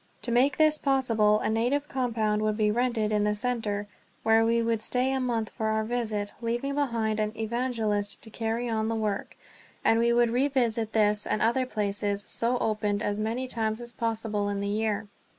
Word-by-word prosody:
To 240 Hz, -, -2 dB
make 260 Hz, +3 st, +3 dB
this 310 Hz, -1 st, +4 dB
possible 225 Hz, -6 st, +2 dB
a -, -, 0 dB
native 250 Hz, +6 st, 0 dB
compound 220 Hz, -6 st, 0 dB
would 215 Hz, 0 st, 0 dB
be 210 Hz, -1 st, +2 dB
rented 235 Hz, -2 st, 0 dB
in 210 Hz, -1 st, +2 dB
the 210 Hz, 0 st, +1 dB
center, 210 Hz, -3 st, -1 dB, 0.4 s
where 225 Hz, 0 st, +4 dB
we 230 Hz, +1 st, +2 dB
would 230 Hz, -1 st, 0 dB
stay 255 Hz, +3 st, 0 dB
a 265 Hz, -, 0 dB
month 235 Hz, -4 st, -1 dB
for 220 Hz, -2 st, -3 dB
our 220 Hz, 0 st, +1 dB
first 215 Hz, -, -7 dB
visit, 215 Hz, -4 st, -2 dB
leaving 240 Hz, +4 st, -1 dB
behind 230 Hz, -6 st, 0 dB
an 215 Hz, 0 st, -1 dB
evangelist 220 Hz, -3 st, -1 dB
to 220 Hz, -, -10 dB
carry 225 Hz, +2 st, -2 dB
on 220 Hz, -1 st, 0 dB
the 225 Hz, -, -1 dB
work; 210 Hz, -3 st, -3 dB, 0.5 s
and 225 Hz, -, +4 dB
we 235 Hz, 0 st, +3 dB
would 235 Hz, -1 st, +3 dB
revisit 240 Hz, -4 st, +1 dB
this 210 Hz, -1 st, +3 dB
and -, -, 0 dB
other 250 Hz, +3 st, +2 dB
places 205 Hz, -2 st, -1 dB
so 235 Hz, +4 st, 0 dB
opened 210 Hz, -2 st, -1 dB
as 205 Hz, 0 st, -1 dB
many 230 Hz, +4 st, -2 dB
times 220 Hz, -2 st, -1 dB
as 240 Hz, 0 st, -4 dB
possible 225 Hz, -3 st, -2 dB
in 200 Hz, -1 st, -2 dB
the 200 Hz, -, -2 dB
year. 215 Hz, 0 st, -1 dB
225 Hz, 195 wpm, -27 LUFS, 215-240 Hz, 0.5 s, this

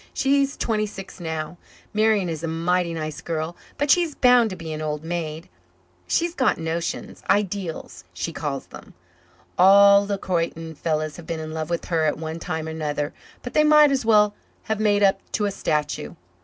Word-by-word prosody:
She's 275 Hz, 0 st, +2 dB
twenty 215 Hz, -2 st, 0 dB
six 195 Hz, -2 st, -10 dB
now. 160 Hz, 0 st, -5 dB, 0.3 s
Marian 215 Hz, -3 st, +2 dB
is 160 Hz, -2 st, -4 dB
a 165 Hz, -, -3 dB
mighty 170 Hz, +2 st, 0 dB
nice 155 Hz, -1 st, -5 dB
girl, 165 Hz, 0 st, -3 dB, 0.2 s
but 290 Hz, 0 st, +2 dB
she's 340 Hz, -4 st, +3 dB
bound 245 Hz, -3 st, +5 dB
to 185 Hz, -, -6 dB
be 165 Hz, -3 st, -6 dB
an 155 Hz, -, -5 dB
old 150 Hz, 0 st, -3 dB
maid. 165 Hz, -1 st, -4 dB, 0.6 s
She's 340 Hz, 0 st, +1 dB
got 260 Hz, -6 st, +1 dB
notions 165 Hz, +1 st, -4 dB
ideals, 195 Hz, -3 st, -1 dB
she -, -, -4 dB
calls -, -, -4 dB
'em. -, -, -12 dB, 0.6 s
All 200 Hz, +2 st, +7 dB
the 200 Hz, -1 st, -1 dB
Croyden 165 Hz, -3 st, -2 dB
fellows 155 Hz, -1 st, -2 dB
have 170 Hz, -, -11 dB
been 165 Hz, -1 st, -3 dB
in 155 Hz, 0 st, -6 dB
love 160 Hz, 0 st, -4 dB
with 170 Hz, -1 st, -2 dB
her 165 Hz, -2 st, +1 dB
at 150 Hz, -, 0 dB
one 160 Hz, +1 st, -5 dB
time 160 Hz, -2 st, -4 dB
or -, -, -4 dB
another 150 Hz, -2 st, -3 dB, 0.3 s
but 245 Hz, -, -6 dB
they 305 Hz, -, +4 dB
might 300 Hz, -1 st, +6 dB
as 270 Hz, -2 st, 0 dB
well 210 Hz, -2 st, +4 dB, 0.3 s
have 220 Hz, -1 st, -2 dB
made 205 Hz, -1 st, +3 dB
up 195 Hz, -1 st, +4 dB
to 210 Hz, -, +1 dB
a 200 Hz, -, 0 dB
statue. 150 Hz, -4 st, -2 dB
175 Hz, 185 wpm, -23 LUFS, 160-210 Hz, 0.6 s, All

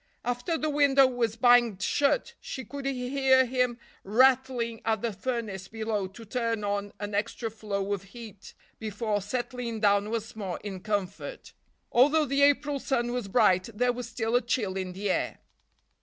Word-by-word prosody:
After 245 Hz, +7 st, -1 dB
the 310 Hz, -, -1 dB
window 280 Hz, -2 st, +5 dB
was 240 Hz, -4 st, 0 dB
banged 240 Hz, -4 st, +4 dB
shut 390 Hz, -, +1 dB
she 260 Hz, -, -6 dB
could 280 Hz, -1 st, -6 dB
hear 260 Hz, 0 st, +3 dB
him 250 Hz, -1 st, 0 dB, 0.3 s
rattling 245 Hz, +1 st, +2 dB
at 220 Hz, -1 st, 0 dB
the 230 Hz, -2 st, -1 dB
furnace 215 Hz, -5 st, -4 dB
below 220 Hz, -3 st, -2 dB
to 210 Hz, +5 st, -12 dB
turn 230 Hz, -1 st, -2 dB
on 205 Hz, 0 st, -2 dB
an 205 Hz, 0 st, -5 dB
extra 220 Hz, +2 st, -2 dB
flow 205 Hz, -2 st, -3 dB
of 200 Hz, -, -3 dB
heat 215 Hz, -1 st, -12 dB, 0.2 s
before 215 Hz, -1 st, -2 dB
settling 240 Hz, +1 st, -4 dB
down 205 Hz, 0 st, +3 dB
once 225 Hz, -1 st, -4 dB
more 195 Hz, -5 st, -4 dB
in 195 Hz, -3 st, -5 dB
comfort. 205 Hz, -, -4 dB, 0.4 s
Although 295 Hz, +5 st, +5 dB
the 275 Hz, +1 st, 0 dB
April 285 Hz, 0 st, +3 dB
sun 240 Hz, -3 st, -1 dB
was 245 Hz, -4 st, -3 dB
bright, 185 Hz, 0 st, +3 dB
there 245 Hz, +2 st, +2 dB
was 245 Hz, -1 st, -6 dB
still 230 Hz, 0 st, -1 dB
a 245 Hz, -, +4 dB
chill 220 Hz, -5 st, -1 dB
in 185 Hz, -1 st, -3 dB
the 195 Hz, +1 st, -1 dB
air. -, -, -1 dB
230 Hz, 165 wpm, -28 LUFS, 205-255 Hz, 0.4 s, window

